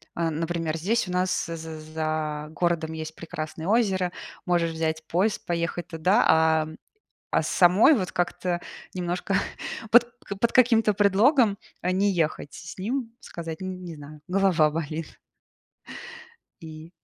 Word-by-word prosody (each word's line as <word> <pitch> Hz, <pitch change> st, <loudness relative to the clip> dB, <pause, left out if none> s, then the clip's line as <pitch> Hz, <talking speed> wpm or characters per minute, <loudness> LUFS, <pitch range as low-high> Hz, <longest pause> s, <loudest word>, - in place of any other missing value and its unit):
Э, 170 Hz, -1 st, 0 dB
например, 165 Hz, 0 st, -2 dB
здесь 210 Hz, +6 st, 0 dB
у -, -, -5 dB
нас 180 Hz, 0 st, 0 dB
з 165 Hz, -, -5 dB
з 160 Hz, -1 st, -7 dB
за 155 Hz, -1 st, -2 dB
городом 170 Hz, -2 st, 0 dB
есть 160 Hz, 0 st, -6 dB
прекрасное 160 Hz, 0 st, -6 dB
озеро. 195 Hz, -5 st, +2 dB, 0.4 s
Можешь 170 Hz, -2 st, +2 dB
взять 160 Hz, -1 st, -2 dB
поезд, 195 Hz, +5 st, 0 dB
поехать 170 Hz, 0 st, -2 dB
туда, 180 Hz, +6 st, +2 dB
а, 160 Hz, -1 st, +4 dB, 0.6 s
а -, -, +3 dB
самой 185 Hz, -, +5 dB
вот 190 Hz, -9 st, -1 dB
как-то 175 Hz, 0 st, -1 dB, 0.3 s
немножко 180 Hz, +2 st, -2 dB, 0.6 s
под 240 Hz, +1 st, +8 dB, 0.2 s
к 200 Hz, -, -5 dB
под 235 Hz, +3 st, +2 dB
каким-то 225 Hz, -4 st, +4 dB
предлогом, 205 Hz, +3 st, +4 dB, 0.2 s
э, 180 Hz, -, 0 dB
не 200 Hz, +2 st, +2 dB
ехать 155 Hz, -5 st, -1 dB
с 170 Hz, -, -8 dB
с -, -, -24 dB
ним, 230 Hz, +4 st, -3 dB
сказать: 165 Hz, -1 st, -7 dB
"Н 185 Hz, -1 st, -5 dB
не 170 Hz, -2 st, -7 dB
знаю, 150 Hz, +1 st, -11 dB
голова 185 Hz, -5 st, +3 dB
болит". 160 Hz, 0 st, -5 dB, 1.4 s
И 160 Hz, 0 st, -10 dB
175 Hz, 145 wpm, -26 LUFS, 160-195 Hz, 1.4 s, под